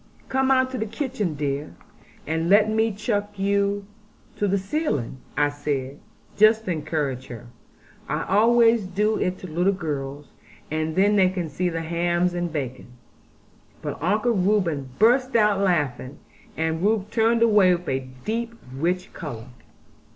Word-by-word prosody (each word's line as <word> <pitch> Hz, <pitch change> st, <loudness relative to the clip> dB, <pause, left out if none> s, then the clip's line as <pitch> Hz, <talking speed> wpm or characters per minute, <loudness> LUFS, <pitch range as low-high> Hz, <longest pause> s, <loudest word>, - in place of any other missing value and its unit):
'Come 265 Hz, 0 st, +1 dB
out 260 Hz, -1 st, +3 dB
to 255 Hz, -, -4 dB
the 220 Hz, -, -2 dB
kitchen, 225 Hz, -, -3 dB
dear, 145 Hz, 0 st, -3 dB, 0.5 s
and 160 Hz, +2 st, -1 dB
let 205 Hz, +2 st, +6 dB
me 220 Hz, +1 st, +2 dB
chuck 205 Hz, 0 st, -3 dB
you 200 Hz, +1 st, 0 dB, 0.5 s
to 205 Hz, -, 0 dB
the 200 Hz, +1 st, +2 dB
ceiling,' 190 Hz, -, -2 dB, 0.2 s
I 145 Hz, 0 st, +3 dB
said, 145 Hz, -1 st, -4 dB, 0.4 s
just 220 Hz, +1 st, +5 dB
to 185 Hz, -, -1 dB
encourage 150 Hz, -5 st, -2 dB
her; 120 Hz, -1 st, -9 dB, 0.6 s
'I -, -, -1 dB
always 230 Hz, +2 st, +4 dB
do 210 Hz, +4 st, 0 dB
it 180 Hz, 0 st, -1 dB
to 185 Hz, -, -9 dB
little 175 Hz, +4 st, +1 dB
girls; 145 Hz, -5 st, -5 dB, 0.4 s
and 155 Hz, 0 st, -2 dB
then 205 Hz, +2 st, +4 dB
they 185 Hz, -2 st, +5 dB
can 180 Hz, -3 st, -3 dB
see 180 Hz, +5 st, -1 dB
the 165 Hz, -1 st, -3 dB
hams 175 Hz, +2 st, 0 dB
and 175 Hz, -1 st, -2 dB
bacon.' 130 Hz, -4 st, -5 dB, 0.9 s
But -, -, -5 dB
Uncle 210 Hz, +8 st, +1 dB
Reuben 180 Hz, -, +1 dB
burst 250 Hz, +4 st, +3 dB
out 210 Hz, -3 st, +4 dB
laughing; 145 Hz, -8 st, 0 dB, 0.4 s
and 160 Hz, 0 st, -1 dB
Ruth 210 Hz, +1 st, +1 dB
turned 230 Hz, 0 st, +3 dB
away 205 Hz, -5 st, +5 dB
with 175 Hz, 0 st, -9 dB
a 130 Hz, 0 st, -2 dB, 0.2 s
deep 230 Hz, +1 st, -2 dB, 0.2 s
rich 180 Hz, +7 st, -2 dB
colour. 125 Hz, -7 st, -7 dB
185 Hz, 150 wpm, -24 LUFS, 155-215 Hz, 0.9 s, let